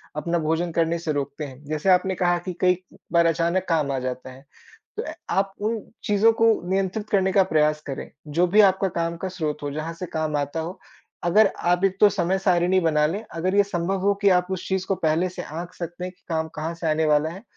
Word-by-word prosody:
अपना 170 +3 -1
भोजन 165 +2 -1
करने 165 +1 +1
से 165 -2 -2
रोकते 145 +1 -3
है। 135 0 -11
जैसे 155 +5 -1
आपने 185 +1 +3
कहा 175 -1 +2
कि 185 - -2
कई 180 -1 +4 0.4
बार 170 0 +5
अचानक 170 +3 +1
काम 155 -4 +1
आ 135 - -1
जाता 130 0 -5
है, 130 +1 -14 0.6
तो 445 - -2
अ, - - -6 0.2
आप 195 0 0
उन 220 +2 0 0.2
चीज़ों 210 +1 +4
को 225 0 +6 0.2
नियंत्रित 195 +3 -1
करने 190 -2 +2
का 195 0 +5
प्रयास 150 -3 +1
करें। 135 - -5 0.2
जो 170 +5 +2
भी 205 +5 +6
आपका 195 -1 +4
काम 170 0 -1
का 190 - -4
स्रोत 150 -3 -3
हो 145 - -3
जहाँ 155 +3 -4
से 180 - -3
काम 155 -2 -2
आता 145 +2 -2
हो। 170 +4 -5 0.4
अगर 200 +5 +5 0.2
आप 180 +1 +1
एक 190 0 0
तो 210 - +7
समय 190 -1 0
सारिणी 185 -1 +3
बना 155 -3 +2
लें, 200 +8 -3
अगर 185 +4 -1
ये 205 - +6
संभव 190 0 -2
हो 200 +1 +3
कि 200 - +5
आप 180 0 -1
उस 185 -1 -4
चीज़ 190 -1 -1
को 195 - +1
पहले 165 +2 +1
से 180 - -7
आँक 170 +3 -7
सकते 175 +1 -6
हैं 180 - -4
कि 180 - -36
काम 160 -1 -1
कहाँ 155 +2 -3
से 165 0 -4
आने 155 +1 +1
वाला 150 +1 +3
है 190 +6 -10
175 Hz, 235 wpm, -24 LUFS, 155-190 Hz, 0.6 s, तो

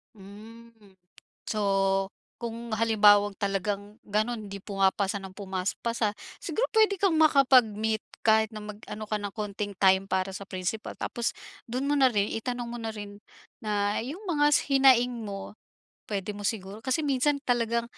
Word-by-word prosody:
Hmm. 220 +4 -13 0.8
So, 215 -1 -1 0.7
kung 235 -1 -5
halimbawang 205 -2 +5
talagang 200 0 -2
gano'n 215 +2 -1
hindi 200 0 -7
pumapasa 195 0 0
ng 190 - -8
pumas 190 -1 -3
pasa, 230 -3 0 0.3
siguro 400 +9 0
pwede 425 -4 +4
kang 385 -5 +3
makapag-meet 250 -8 +4 0.2
kahit 220 0 +4
na 215 - -7
mag-ano 210 0 -8
ka 215 - -1
ng 205 -1 -4
konting 205 -1 -4
time 190 0 +5
para 190 0 -1
sa 200 - -6
principal. 190 +3 -4
Tapos 235 -1 -2 0.3
dun 255 +4 -3
mo 290 - +2
na 265 -3 +5
rin, 205 -2 +1
itanong 245 +1 -3
mo 235 - -6
na 225 -1 -4
rin 205 -1 -9 0.4
na 205 -1 0
yung 340 - -7
mga 295 -4 +3
s - - +5
hinaing 250 -4 +4
mo. 200 0 -7 0.5
Pwede 205 -1 -3
mo 205 - -9
siguro 205 0 -3
kasi 260 +5 -1
minsan 280 +1 +2
talagang, 235 -2 +1
215 Hz, 155 wpm, -28 LUFS, 205-245 Hz, 0.8 s, halimbawang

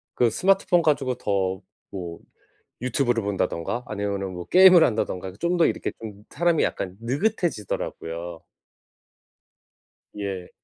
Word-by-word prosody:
그 120 - +3
스마트폰 185 - +3
가지고 140 -5 +1
더 95 -3 -1 0.3
뭐 85 -3 -6 0.6
유튜브를 125 -2 0
본다든가 100 +3 -2
아니면은 100 -2 -3
뭐 90 -1 -6
게임을 185 -2 +8
한다든가 95 - 0
좀 175 +5 0
더 170 - +5
이렇게 - - -2
좀 105 -2 -9
사람이 170 -2 +2
약간 95 -1 -3
느긋해지더라고요. 115 - -3 1.8
예. 95 -3 -5
105 Hz, 280 characters per minute, -24 LUFS, 95-160 Hz, 1.8 s, 게임을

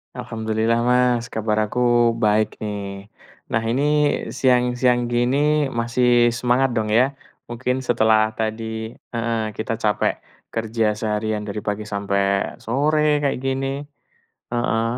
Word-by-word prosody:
Alhamdulillah, 110 +1 -1
Mas, 125 -1 +3
kabar 110 -1 -1
aku 125 - -3 0.4
baik, 105 +1 +3 0.2
nih. 105 -1 -3 0.7
Nah, 115 0 +1
ini 130 +4 +1 0.6
siang-siang 125 -1 +3
gini, 120 +3 +2 0.4
masih 120 +1 +1 0.3
semangat, 125 +2 +2
dong, 110 -1 0
ya. 125 +6 +3 0.4
Mungkin 125 +2 -2
setelah 110 -3 +3
tadi, 110 0 -2 0.5
heeh, 115 -1 -1 0.2
kita 110 +1 -2
capek 105 -2 +1 0.4
kerja 110 -1 0
seharian 105 -1 -1
dari 105 +1 -4
pagi 105 +1 -3
sampai 100 -1 -1
sore, 145 +6 +1 0.2
kayak 140 - +1
gini. 135 0 -1 0.8
Heeh. 115 -2 0
115 Hz, 115 wpm, -22 LUFS, 110-125 Hz, 0.8 s, Mas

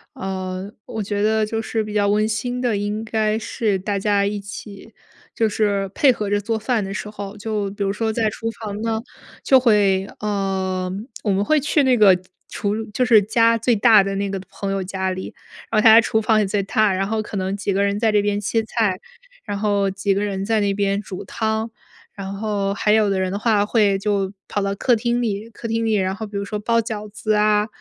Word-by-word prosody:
呃， 190 +1 -5
我 220 - -5
觉 205 0 -2
得 220 0 +2
就 225 +1 -3
是 220 0 -2
比 210 - -7
较 205 -1 +2
温 210 +1 +2
馨 245 +3 -2
的， 235 -5 +1
应 205 +2 -2
该 220 -1 0
是 210 -2 -1
大 200 +1 -2
家 200 0 +1
一 205 0 -2
起 205 +1 -10 0.4
就 225 -1 +2
是 200 -2 0
配 275 -3 +5
合 210 -3 -4
着 205 - +2
做 220 +2 -2
饭 220 -1 0
的 195 +1 -5
时 210 - -5
候。 205 -1 -7
就 205 -1 -2
比 200 0 -4
如 195 - 0
说 220 +1 -1
在 220 -2 +1
厨 225 +2 -4
房 210 -1 -5
呢， 225 -1 -1 0.4
就 265 -1 +6
会 200 -5 +3
呃， 190 -3 -2 0.3
我 205 - +1
们 195 +1 +1
会 310 +6 +3
去 295 +1 +2
那 260 -2 +3
个 200 -4 +7 0.3
厨 210 +2 -2
就 250 - 0
是 225 -5 +5
家 230 +2 +3
最 230 +1 +2
大 215 -1 +6
的 195 0 -3
那 200 0 -1
个 195 - -3
朋 195 -1 -4
友 195 -1 -1
家 190 0 -2
里， 185 0 -5 0.4
然 215 -1 +3
后 - - -4
他 225 - +8
家 225 - +9
厨 220 -1 +1
房 215 0 +3
也 210 - +2
最 200 +1 0
大， 215 0 +2
然 195 +1 -1
后 220 0 -1
可 210 - -8
能 190 +1 -2
几 200 0 -1
个 200 +1 +1
人 200 0 0
在 225 -2 +2
这 210 -1 +3
边 205 0 0
切 225 +2 0
菜， 220 -4 0 0.5
然 205 -2 -3
后 200 -1 +1
几 195 +1 0
个 200 +1 -1
人 195 -1 -2
在 220 0 +1
那 200 -1 0
边 200 0 0
煮 190 -3 -8
汤， 220 0 -2 0.4
然 195 -1 -6
后 200 -1 -1
还 210 - +1
有 215 -1 +4
的 190 -1 0
人 185 0 -1
的 200 - -3
话 210 -2 +2
会 205 -3 +2
就 195 -1 -1 0.2
跑 205 - -2
到 200 0 -1
客 245 +3 +2
厅 240 +2 0
里， 215 0 -3
客 230 - -8
厅 225 0 -1
里， 220 -1 +1
然 190 -1 0
后 220 +1 -6
比 205 -1 -6
如 200 - -3
说 210 0 -4
包 230 +2 +1
饺 215 -2 -4
子 215 +1 -2
啊， 210 0 +3
210 Hz, 250 characters per minute, -21 LUFS, 200-220 Hz, 0.5 s, 家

